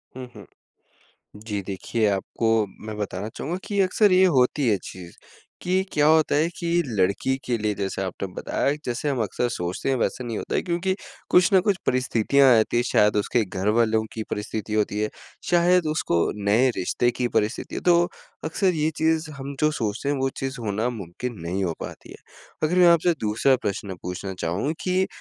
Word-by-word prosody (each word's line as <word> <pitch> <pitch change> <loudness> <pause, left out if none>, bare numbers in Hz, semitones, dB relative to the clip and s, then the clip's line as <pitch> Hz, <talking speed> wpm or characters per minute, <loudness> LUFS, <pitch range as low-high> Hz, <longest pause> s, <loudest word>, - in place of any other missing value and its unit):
हुँ, 130 0 -6
हुँ। 105 -2 -11 1.0
जी 105 -3 -3
देखिए 100 +4 -1
आपको 100 +3 -2 0.4
मैं 110 - -5
बताना 105 0 -4
चाहूँगा 170 +5 -3
कि 200 -1 -2
अक्सर 195 +2 +3
ये 185 +1 +6
होती 135 -4 +2
है 105 - +3
चीज़, 90 -2 -10 0.5
कि 185 +1 +1
क्या 145 0 +3
होता 155 -1 +4
है 155 +3 +3
कि 170 - -4 0.2
लड़की 105 +2 0
के 120 -2 0
लिए 105 -1 -1
जैसे 95 -1 -3
आपने 95 +1 -4
बताया 140 - -1
जैसे 125 +4 -2
हम 135 -4 0
अक्सर 120 +3 -1
सोचते 90 +3 -3
हैं 135 - +2
वैसे 125 - -1
नहीं 115 -3 -4
होता - - -4
है। - - +2
क्योंकि 180 +2 -1 0.3
कुछ 180 +2 +5
ना 190 - +7
कुछ 200 -3 +3
परिस्थितियाँ 130 +2 +3
आती 110 +2 +1
है, 120 - +2
शायद 105 -3 +3
उसके 110 +3 +1
घरवालों 110 +4 +1
की 110 - -4
परिस्थिति 105 0 -4
होती 105 -1 0
है, 105 - 0 0.4
शायद 175 0 +4
उसको 155 - 0 0.3
नए 115 +6 +4
रिश्ते 120 +6 +1
की 125 0 -1
परिस्थिति 105 +4 -2
है। - - -3
तो 175 -1 +4 0.4
अक्सर 180 +4 +1
ये 155 0 +1
चीज़ 160 0 +1
हम 140 +1 -6
जो 155 0 +3
सोचते 115 0 -2
हैं 145 - +1
वो 135 0 0
चीज़ 135 0 -3
होना 110 +2 -1
मुमकिन 115 +2 -6
नहीं 90 +4 -2
हो 85 -3 -1
पाती - - -9
है। - - -9 0.5
अगर 155 +3 +2
मैं 180 - +7
आपसे 170 +1 +4
दूसरा 115 +5 +3
प्रश्न 100 -1 -3
पूछना 90 +2 -5
चाहूँ 90 - -1
कि 185 +1 +1
120 Hz, 190 wpm, -24 LUFS, 105-155 Hz, 1.0 s, ना